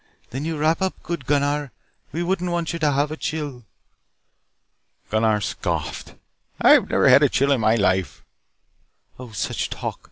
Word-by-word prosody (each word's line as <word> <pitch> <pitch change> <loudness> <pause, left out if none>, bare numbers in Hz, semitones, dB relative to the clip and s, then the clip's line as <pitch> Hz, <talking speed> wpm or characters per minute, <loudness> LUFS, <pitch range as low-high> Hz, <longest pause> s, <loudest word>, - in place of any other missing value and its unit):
"Then 135 +5 -4
you 160 -1 -2
wrap 155 +3 +1
up 190 0 -2
good, 170 -7 -5
Gunnar. 145 -1 0 0.4
We 165 +5 -2
wouldn't 180 0 -1
want 170 -1 -2
you 170 - -4
to 150 -2 +2
have 145 +2 0
a 155 - -5
chill." 145 -8 -4 1.5
Gunnar 110 -1 +2
scoffed, - - -4 0.4
"I - - +7
never - - +1
had - - +7
a - - +4
chill 140 +1 +1
in 135 -4 +2
my 110 +1 +3
life." 95 -8 0 1.0
"Oh, 125 -1 -9
such 105 - -3
talk. - - -5
145 Hz, 160 wpm, -22 LUFS, 115-160 Hz, 1.5 s, I